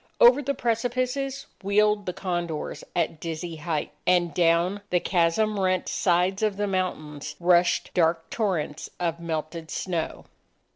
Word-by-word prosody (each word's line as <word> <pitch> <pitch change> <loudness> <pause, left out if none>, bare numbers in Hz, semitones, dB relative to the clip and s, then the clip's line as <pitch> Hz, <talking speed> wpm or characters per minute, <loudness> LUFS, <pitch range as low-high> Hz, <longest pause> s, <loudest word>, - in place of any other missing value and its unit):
Over 480 -11 +7
the 280 0 -1
precipices, 255 +4 -1 0.2
wheeled 205 +1 +2
the - - 0
condors 175 -4 -3
at 165 -2 0
dizzy 165 0 -5
height. 155 -1 -2 0.2
And 175 -3 +3
down 170 +4 +2
the 180 - +3
chasm 195 +5 +1
rent 185 -1 +1
sides 180 +2 +1
of 210 -2 +1
the 205 - 0
mountains, 155 -6 -3
rushed 175 0 +3
dark 165 -1 +2
torrents 180 -9 -2
of 170 -2 -1
melted 160 0 -4
snow. 175 -4 -3
180 Hz, 135 wpm, -26 LUFS, 165-205 Hz, 0.2 s, Over